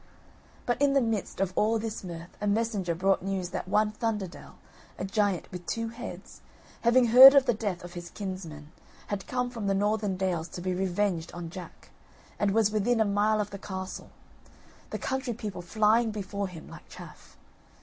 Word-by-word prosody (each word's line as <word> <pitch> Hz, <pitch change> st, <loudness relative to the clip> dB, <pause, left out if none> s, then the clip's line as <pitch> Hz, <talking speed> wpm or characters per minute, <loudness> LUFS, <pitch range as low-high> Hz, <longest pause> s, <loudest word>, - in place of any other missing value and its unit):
But 245 Hz, +3 st, -1 dB
in 285 Hz, -1 st, +4 dB
the 275 Hz, -, +5 dB
midst 225 Hz, -8 st, -2 dB
of 190 Hz, -1 st, 0 dB
all 220 Hz, +2 st, +2 dB
this 220 Hz, -1 st, -4 dB
mirth 170 Hz, -1 st, -8 dB
a 210 Hz, -, -1 dB
messenger 205 Hz, -5 st, 0 dB
brought 195 Hz, +3 st, +2 dB
news 190 Hz, -1 st, -2 dB
that -, -, -5 dB
one 210 Hz, +2 st, +2 dB
Thunderdell, 215 Hz, -5 st, -4 dB, 0.4 s
a -, -, -3 dB
giant 200 Hz, -2 st, 0 dB
with 180 Hz, -1 st, -8 dB
two 230 Hz, 0 st, -2 dB
heads, 230 Hz, +1 st, -9 dB, 0.4 s
having 240 Hz, +1 st, +5 dB
heard 260 Hz, +4 st, +11 dB
of 275 Hz, -2 st, +6 dB
the 240 Hz, -, +3 dB
death 205 Hz, -5 st, -3 dB
of 175 Hz, 0 st, -9 dB
his 175 Hz, -1 st, -7 dB
kinsmen, 170 Hz, -7 st, -7 dB, 0.4 s
had 200 Hz, -2 st, -4 dB
come 250 Hz, -1 st, -1 dB
from 225 Hz, -4 st, -4 dB
the 195 Hz, -, +2 dB
northern 205 Hz, -1 st, 0 dB
dales 180 Hz, -3 st, -1 dB
to 175 Hz, -, -8 dB
be 185 Hz, +1 st, -1 dB
revenged 185 Hz, -2 st, -1 dB
on 175 Hz, -1 st, -6 dB
Jack, 180 Hz, 0 st, -11 dB, 0.5 s
and 205 Hz, -, +2 dB
was 215 Hz, +1 st, +3 dB
within 220 Hz, +3 st, +1 dB
a 220 Hz, -, +4 dB
mile 210 Hz, +1 st, +2 dB
of 210 Hz, -1 st, -2 dB
the 200 Hz, -, -7 dB
castle, 190 Hz, -1 st, -6 dB, 0.8 s
the -, -, -3 dB
country 265 Hz, -3 st, -2 dB
people 210 Hz, -5 st, -5 dB
flying 215 Hz, +5 st, +2 dB
before 200 Hz, -1 st, -3 dB
him 170 Hz, -4 st, -10 dB
like -, -, -13 dB
chaff. -, -, -13 dB
205 Hz, 185 wpm, -28 LUFS, 185-225 Hz, 0.8 s, heard